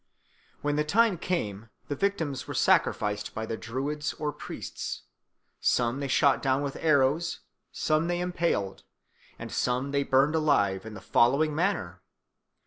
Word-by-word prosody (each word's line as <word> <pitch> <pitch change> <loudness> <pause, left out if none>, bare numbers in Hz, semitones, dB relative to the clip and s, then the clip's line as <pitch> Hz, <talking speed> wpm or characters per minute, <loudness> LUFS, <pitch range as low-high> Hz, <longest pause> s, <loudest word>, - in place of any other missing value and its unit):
When 145 0 0
the 150 - +2
time 200 +3 +3
came 115 - -3 0.2
the 145 - -2
victims 160 -7 -1
were - - -5
sacrificed 105 -1 +1
by 110 - -3
the 115 - -3
Druids 140 +7 -3
or 150 -1 -3
priests. - - -6 0.6
Some 120 +2 +1
they 140 - -2
shot 140 +1 +3
down 135 +1 +1
with 140 -1 -3
arrows, 150 +2 +2 0.3
some 155 +1 +1
they 175 0 0
impaled, 170 - -1 0.5
and - - -8
some 125 +3 0
they 140 0 +1
burned 140 +2 +3
alive 110 -11 +2
in 110 - -8
the 95 - -9
following 140 +10 +3
manner. 150 - -1
140 Hz, 145 wpm, -28 LUFS, 120-155 Hz, 0.6 s, time